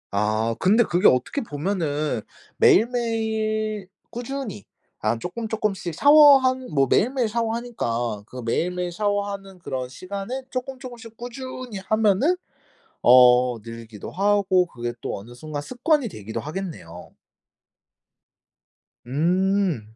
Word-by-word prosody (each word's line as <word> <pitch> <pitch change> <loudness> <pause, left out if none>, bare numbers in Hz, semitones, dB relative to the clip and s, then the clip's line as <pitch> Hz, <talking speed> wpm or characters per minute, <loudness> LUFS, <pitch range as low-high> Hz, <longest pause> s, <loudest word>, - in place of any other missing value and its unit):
아 110 +3 0
근데 215 +6 +4
그게 175 -4 +3
어떻게 130 - +2
보면은 155 - -2 0.4
매일매일 220 - +1 0.2
꾸준히 240 - -6 0.3
아 115 - 0
쪼끔쪼끔씩 205 - -3
샤워하는 270 - +6
뭐 135 -2 +3
매일매일 245 - +2
샤워하니까 220 - -2
그 125 +1 -8
매일매일 180 +8 -1
샤워하는 200 0 -3
그런 130 -6 -4
시간에 200 - -6
쪼끔쪼끔씩 250 -3 -7
꾸준히 250 -1 -7
하면은 215 - +3 0.7
어 125 -1 +6
늘기도 115 -2 -9
하고 195 -1 +2
그게 120 -7 -5
또 - - -4
어느 115 +5 -12
순간 150 +2 -6
습관이 260 - 0
되기도 110 - -6
하겠네요. 150 - -7 1.9
음. 170 - 0
195 Hz, 260 characters per minute, -23 LUFS, -, 1.9 s, 샤워하는